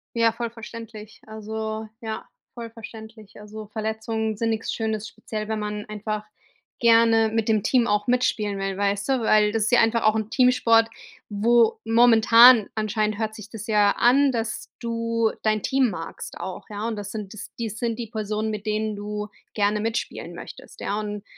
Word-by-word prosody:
Ja, 230 Hz, -1 st, +4 dB
voll 235 Hz, +1 st, -4 dB
verständlich. 225 Hz, -2 st, -10 dB
Also, 220 Hz, 0 st, -5 dB
ja, 220 Hz, -1 st, -5 dB, 0.3 s
voll 235 Hz, -1 st, -7 dB
verständlich. 220 Hz, -2 st, -12 dB
Also, 210 Hz, +1 st, -9 dB
Verletzungen 220 Hz, +1 st, -3 dB
sind 230 Hz, +1 st, 0 dB
nix 225 Hz, 0 st, -2 dB
Schönes, 220 Hz, -1 st, -2 dB
speziell, 215 Hz, +1 st, -6 dB
wenn 220 Hz, 0 st, -2 dB
man 210 Hz, 0 st, -4 dB
einfach 215 Hz, 0 st, -4 dB, 0.6 s
gerne 230 Hz, -1 st, +5 dB
mit 225 Hz, 0 st, -1 dB
dem 215 Hz, -2 st, +2 dB
Team 240 Hz, +2 st, +2 dB
auch 205 Hz, 0 st, +1 dB
mitspielen 215 Hz, -5 st, 0 dB
will, 195 Hz, -1 st, -3 dB
weißt 200 Hz, +2 st, -1 dB
du, 265 Hz, -2 st, +2 dB
weil 215 Hz, -1 st, +4 dB
das 225 Hz, 0 st, 0 dB
ist 220 Hz, -, 0 dB
ja 245 Hz, -, +6 dB
einfach 225 Hz, +1 st, +2 dB
auch 215 Hz, 0 st, +4 dB
'n 220 Hz, -1 st, -2 dB
Teamsport, 240 Hz, -3 st, +4 dB, 0.4 s
wo 225 Hz, +2 st, +3 dB
momentan 230 Hz, 0 st, +7 dB
anscheinend 215 Hz, -1 st, -1 dB
hört 220 Hz, 0 st, -2 dB
sich 215 Hz, -1 st, -10 dB
das 220 Hz, -1 st, -8 dB
ja 210 Hz, -3 st, +3 dB
an, 270 Hz, +3 st, +4 dB
dass 230 Hz, -2 st, -4 dB
du 230 Hz, -1 st, -1 dB
dein 215 Hz, -1 st, 0 dB
Team 265 Hz, -2 st, +2 dB
magst 165 Hz, -4 st, -7 dB
auch, 190 Hz, -1 st, -6 dB
ja? 210 Hz, +1 st, -4 dB
Und 230 Hz, -, -2 dB
das 205 Hz, -1 st, -6 dB
sind 210 Hz, -2 st, -6 dB
das 215 Hz, -, -9 dB
dies 220 Hz, -2 st, -4 dB
sind 230 Hz, -2 st, -1 dB
die 235 Hz, -2 st, -5 dB
Personen, 215 Hz, -1 st, -2 dB
mit 210 Hz, 0 st, -6 dB
denen 215 Hz, 0 st, -1 dB
du 210 Hz, +1 st, -5 dB, 0.3 s
gerne 210 Hz, 0 st, +1 dB
mitspielen 225 Hz, +2 st, -4 dB
möchtest, -, -, -11 dB
ja, 205 Hz, -, -2 dB
und 210 Hz, -1 st, -5 dB
220 Hz, 180 wpm, -24 LUFS, 210-230 Hz, 0.6 s, momentan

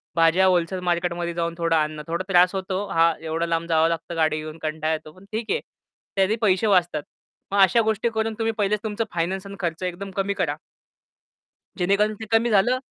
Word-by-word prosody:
भाज्या 165 Hz, +3 st, +4 dB
व्होलसेल 180 Hz, 0 st, +1 dB
मार्केटमध्ये 170 Hz, 0 st, -1 dB
जाऊन 170 Hz, 0 st, -2 dB
थोडा 165 Hz, -1 st, +2 dB
आणणं. 155 Hz, 0 st, -3 dB
थोडा 170 Hz, +3 st, -2 dB
त्रास 180 Hz, +1 st, +5 dB
होतो, 190 Hz, +1 st, -2 dB
हां, 165 Hz, 0 st, +3 dB
एवढा 165 Hz, +1 st, -1 dB
लांब 165 Hz, 0 st, -1 dB
जावं 160 Hz, 0 st, +4 dB
लागतं 165 Hz, +1 st, -4 dB
गाडी 155 Hz, -1 st, +2 dB
घेऊन. 155 Hz, +1 st, -7 dB
कंटाळा 155 Hz, 0 st, -1 dB
येतो. 155 Hz, -1 st, -6 dB
पण 190 Hz, -, -16 dB
ठीक 220 Hz, +1 st, -3 dB
आहे. 470 Hz, -, +1 dB, 0.6 s
त्याचे 195 Hz, +2 st, +2 dB
पैसे 210 Hz, 0 st, +3 dB
वाचतात. 175 Hz, -6 st, +2 dB, 0.5 s
मग 200 Hz, -, +1 dB
अशा 195 Hz, +5 st, +5 dB
गोष्टी 220 Hz, +1 st, 0 dB
करून 220 Hz, 0 st, -1 dB
तुम्ही 225 Hz, 0 st, 0 dB
पहिलेच 210 Hz, 0 st, +1 dB
तुमचं 220 Hz, +1 st, -2 dB
फायनान्स 185 Hz, +3 st, -2 dB
आणि 200 Hz, -, -8 dB
खर्च 170 Hz, -1 st, -3 dB
एकदम 185 Hz, +2 st, -4 dB
कमी 195 Hz, 0 st, 0 dB
करा. 200 Hz, -, -1 dB, 1.2 s
जेणेकरून 200 Hz, +3 st, +2 dB
ते -, -, -4 dB
कमी 225 Hz, +1 st, +3 dB
झालं 225 Hz, +4 st, +3 dB
180 Hz, 190 wpm, -24 LUFS, 165-200 Hz, 1.2 s, त्रास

